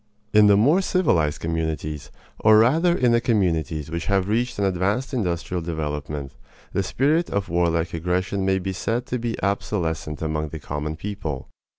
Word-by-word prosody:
In 105 Hz, 0 st, +7 dB
the 100 Hz, -1 st, +6 dB
more 145 Hz, -, +4 dB
civilized 85 Hz, -, +1 dB
communities, 80 Hz, -3 st, -3 dB, 0.3 s
or 110 Hz, 0 st, +6 dB
rather 160 Hz, +10 st, +4 dB
in 125 Hz, -2 st, +3 dB
the 115 Hz, 0 st, +3 dB
communities 80 Hz, -, 0 dB
which 85 Hz, 0 st, -3 dB
have 95 Hz, -1 st, +1 dB
reached 120 Hz, +4 st, 0 dB
an 100 Hz, -, +1 dB
advanced 100 Hz, +9 st, 0 dB
industrial 90 Hz, -5 st, -1 dB
development, 75 Hz, -4 st, -4 dB, 0.4 s
the -, -, +1 dB
spirit 150 Hz, -, +1 dB
of 100 Hz, -1 st, -2 dB
warlike 85 Hz, 0 st, +1 dB
aggression 90 Hz, +4 st, -1 dB
may 95 Hz, 0 st, +2 dB
be 95 Hz, 0 st, -3 dB
said 115 Hz, +6 st, -2 dB
to 125 Hz, -, -3 dB
be 115 Hz, -1 st, -3 dB
obsolescent 85 Hz, -6 st, -2 dB
among 80 Hz, 0 st, -1 dB
the 80 Hz, -, -6 dB
common 75 Hz, +2 st, -4 dB
people. 80 Hz, -8 st, -5 dB
90 Hz, 165 wpm, -23 LUFS, 80-110 Hz, 0.4 s, In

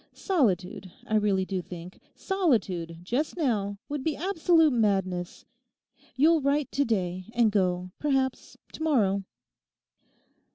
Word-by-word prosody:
Solitude, 195 Hz, -, 0 dB
I -, -, -5 dB
really 200 Hz, -3 st, +1 dB
do 185 Hz, -1 st, -3 dB
think, 175 Hz, +1 st, -10 dB, 0.2 s
solitude 195 Hz, -, -1 dB
just 260 Hz, -, -2 dB
now 210 Hz, -, 0 dB
would 290 Hz, -2 st, -4 dB
be 315 Hz, 0 st, 0 dB
absolute 330 Hz, -3 st, +3 dB
madness. 190 Hz, -6 st, -1 dB, 0.7 s
You'll 315 Hz, +4 st, +4 dB
write 280 Hz, 0 st, 0 dB
to 280 Hz, -, +1 dB
day 185 Hz, -5 st, -1 dB
and 235 Hz, -3 st, +4 dB
go, 185 Hz, -2 st, 0 dB
perhaps, 270 Hz, -3 st, -1 dB, 0.2 s
to -, -, -9 dB
morrow! 205 Hz, -11 st, +2 dB
220 Hz, 120 wpm, -27 LUFS, 185-295 Hz, 0.7 s, You'll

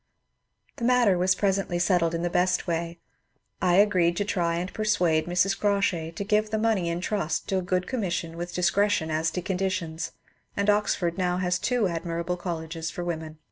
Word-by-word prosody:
^ -, -, -51 dB
The -, -, -6 dB
matter 240 Hz, -5 st, +4 dB
was 180 Hz, +1 st, +2 dB
presently 195 Hz, -2 st, 0 dB
settled 175 Hz, -2 st, +2 dB
in 165 Hz, -, -2 dB
the 175 Hz, -, 0 dB
best 180 Hz, +1 st, +1 dB
way; 170 Hz, 0 st, -2 dB, 0.6 s
I 175 Hz, -1 st, +3 dB
agreed 180 Hz, -4 st, +3 dB
to 205 Hz, -, 0 dB
try 170 Hz, -4 st, 0 dB
and 180 Hz, +3 st, -3 dB
persuade 180 Hz, -8 st, +1 dB
Mrs. 180 Hz, +3 st, +2 dB
Crawshay 195 Hz, -6 st, 0 dB
to 200 Hz, -, -3 dB
give 210 Hz, +1 st, +1 dB
the 220 Hz, -, -1 dB
money 215 Hz, -6 st, +1 dB
in 170 Hz, +1 st, -2 dB
trust 180 Hz, -6 st, -2 dB
to 190 Hz, -, +1 dB
a -, -, -2 dB
good 180 Hz, 0 st, -1 dB
commission 175 Hz, -9 st, -2 dB
with 175 Hz, +1 st, -5 dB
discretion 190 Hz, -2 st, +2 dB
as 160 Hz, +1 st, +1 dB
to 180 Hz, +2 st, -4 dB
conditions, 180 Hz, -3 st, -2 dB, 0.4 s
and 200 Hz, +1 st, +3 dB
Oxford 195 Hz, -4 st, 0 dB
now 180 Hz, -1 st, +1 dB
has 180 Hz, 0 st, 0 dB
two 240 Hz, -4 st, +1 dB
admirable 170 Hz, +1 st, -2 dB
colleges 165 Hz, -2 st, -4 dB
for 175 Hz, -, -5 dB
women. 160 Hz, -2 st, -4 dB
180 Hz, 185 wpm, -26 LUFS, 170-200 Hz, 0.6 s, matter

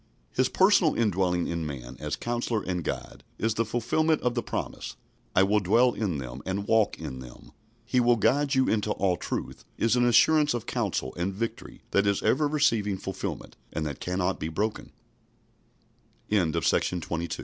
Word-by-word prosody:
His 130 Hz, 0 st, +1 dB
personal 190 Hz, -4 st, +4 dB
indwelling 95 Hz, -5 st, +1 dB
in 85 Hz, -1 st, -2 dB
man, 65 Hz, -5 st, -6 dB
as 75 Hz, 0 st, -3 dB
Counsellor 120 Hz, -2 st, -2 dB
and 90 Hz, -2 st, -2 dB
Guide, -, -, -5 dB
is 110 Hz, 0 st, 0 dB
the 115 Hz, -, +1 dB
fulfilment 120 Hz, +8 st, +1 dB
of 125 Hz, -, +1 dB
the 120 Hz, -, -1 dB
promise -, -, -5 dB, 0.4 s
"I 95 Hz, -, +6 dB
will 105 Hz, +2 st, +3 dB
dwell 115 Hz, +6 st, +3 dB
in 95 Hz, -8 st, -2 dB
them, 65 Hz, -1 st, -7 dB
and 100 Hz, +2 st, -3 dB
walk 110 Hz, -2 st, +3 dB
in 65 Hz, -, -6 dB
them." 60 Hz, -1 st, -12 dB, 0.3 s
"He 125 Hz, -, +1 dB
will 120 Hz, 0 st, +4 dB
guide 135 Hz, +6 st, +2 dB
you 130 Hz, 0 st, +3 dB
into 105 Hz, -1 st, +1 dB
all 95 Hz, -2 st, +1 dB
truth" -, -, -5 dB
is 115 Hz, +1 st, +2 dB
an 125 Hz, -, +3 dB
assurance 150 Hz, +4 st, +4 dB
of 120 Hz, -, -4 dB
counsel 65 Hz, -, -2 dB
and 90 Hz, +3 st, -1 dB
victory 115 Hz, +3 st, -5 dB
that 100 Hz, 0 st, +3 dB
is 100 Hz, -1 st, +1 dB
ever 150 Hz, +3 st, +3 dB
receiving 115 Hz, -10 st, +1 dB
fulfilment, 95 Hz, 0 st, -6 dB, 0.2 s
and 80 Hz, -, -2 dB
that 75 Hz, -3 st, -5 dB
can 90 Hz, +2 st, -2 dB
105 Hz, 160 wpm, -27 LUFS, 90-120 Hz, 0.4 s, I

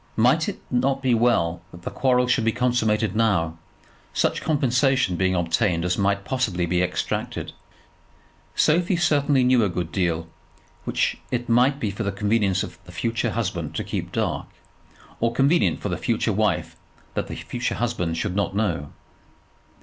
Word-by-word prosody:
Might 130 Hz, -, +3 dB
it 205 Hz, -, -6 dB
not 135 Hz, +2 st, +1 dB
be 130 Hz, -2 st, +3 dB
well 110 Hz, -8 st, +2 dB
that 85 Hz, -1 st, -13 dB
the -, -, -4 dB
quarrel 125 Hz, -1 st, +2 dB
should 125 Hz, -1 st, +2 dB
be 115 Hz, -, +2 dB
consummated 110 Hz, -4 st, +1 dB
now, 90 Hz, -8 st, +1 dB, 0.6 s
such -, -, +1 dB
compensation 135 Hz, -, +2 dB
being 95 Hz, +1 st, +1 dB
obtained 85 Hz, 0 st, +1 dB
as 90 Hz, 0 st, +1 dB
might 100 Hz, 0 st, 0 dB
possibly 110 Hz, -10 st, 0 dB
be 90 Hz, +1 st, +1 dB
extracted. 90 Hz, -, -2 dB, 1.0 s
Sophie 175 Hz, +4 st, +3 dB
certainly 145 Hz, -5 st, +3 dB
knew 125 Hz, -2 st, +4 dB
a 100 Hz, -, +2 dB
good 90 Hz, -1 st, -3 dB
deal, 85 Hz, -3 st, -1 dB, 0.6 s
which -, -, 0 dB
it 120 Hz, -1 st, -2 dB
might 125 Hz, +4 st, +3 dB
be 105 Hz, -6 st, -1 dB
for 100 Hz, -, -6 dB
the 100 Hz, -2 st, 0 dB
convenience 100 Hz, -1 st, +1 dB
of -, -, -9 dB
the 90 Hz, -, -12 dB
future 115 Hz, +7 st, -1 dB
husband 90 Hz, -8 st, -3 dB
to -, -, -1 dB
keep -, -, -4 dB
dark -, -, -1 dB, 0.7 s
or 115 Hz, 0 st, +1 dB
convenient 140 Hz, +6 st, +3 dB
for 105 Hz, -, -2 dB
the 90 Hz, -, -2 dB
future 115 Hz, -2 st, 0 dB
wife 105 Hz, -4 st, 0 dB, 0.4 s
that -, -, -2 dB
the -, -, -6 dB
future 125 Hz, 0 st, -3 dB
husband 100 Hz, -9 st, -1 dB
should 95 Hz, +1 st, -2 dB
not 100 Hz, -1 st, -1 dB
know. 85 Hz, -9 st, -1 dB
110 Hz, 165 wpm, -24 LUFS, 90-125 Hz, 1.0 s, knew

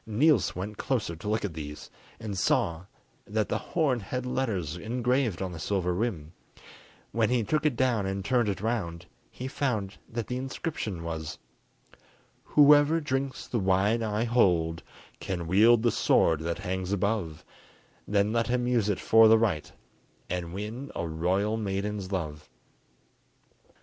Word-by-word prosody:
Niels 120 Hz, -, +3 dB
went 100 Hz, +4 st, -5 dB
closer 120 Hz, -11 st, -1 dB
to 95 Hz, +6 st, -6 dB
look 110 Hz, 0 st, 0 dB
at 95 Hz, -, -4 dB
these, 75 Hz, -1 st, -8 dB, 0.3 s
and 105 Hz, -3 st, -5 dB
saw 85 Hz, -2 st, +1 dB, 0.4 s
that 110 Hz, 0 st, -1 dB
the -, -, 0 dB
horn 145 Hz, -8 st, 0 dB
had 125 Hz, +5 st, -4 dB
letters 105 Hz, -, -2 dB
engraved 120 Hz, 0 st, 0 dB
on 95 Hz, -, -4 dB
the 85 Hz, -, -7 dB
silver 90 Hz, +1 st, 0 dB
rim: 90 Hz, -6 st, -3 dB, 0.8 s
when 115 Hz, -1 st, +1 dB
he 125 Hz, -2 st, +2 dB
took 155 Hz, +7 st, +1 dB
it 140 Hz, -, 0 dB
down 115 Hz, -6 st, +1 dB
and 95 Hz, 0 st, -3 dB
turned 120 Hz, -1 st, +2 dB
it 95 Hz, -, -3 dB
round, 90 Hz, -7 st, -2 dB, 0.2 s
he 130 Hz, -, -7 dB
found 120 Hz, -8 st, -2 dB
that 115 Hz, -1 st, -3 dB
the 125 Hz, -, -3 dB
inscription 130 Hz, -, -4 dB
was:— 80 Hz, -2 st, -5 dB, 1.1 s
Whoever 150 Hz, +2 st, +6 dB
drinks 135 Hz, -3 st, -3 dB
the 120 Hz, -, -2 dB
wine 95 Hz, +4 st, +2 dB
I 110 Hz, 0 st, 0 dB
hold 90 Hz, -9 st, +2 dB, 0.4 s
Can 90 Hz, -3 st, -4 dB
wield 110 Hz, +7 st, +5 dB
the 120 Hz, -, +3 dB
sword 80 Hz, -5 st, +3 dB
that 85 Hz, +1 st, -3 dB
hangs 95 Hz, -1 st, -3 dB
above; 100 Hz, -5 st, -1 dB, 0.6 s
Then 105 Hz, +1 st, +1 dB
let 115 Hz, -1 st, +1 dB
him 125 Hz, 0 st, 0 dB
use 115 Hz, -4 st, +2 dB
it 100 Hz, -, 0 dB
for 115 Hz, 0 st, +6 dB
the 110 Hz, +1 st, +7 dB
right, 100 Hz, -9 st, 0 dB, 0.6 s
And 90 Hz, -2 st, -3 dB
win 110 Hz, +8 st, -6 dB
a 85 Hz, -, -2 dB
royal 95 Hz, +7 st, 0 dB
maiden's 100 Hz, -1 st, -3 dB
love. 75 Hz, -5 st, -4 dB
105 Hz, 155 wpm, -28 LUFS, 90-120 Hz, 1.1 s, the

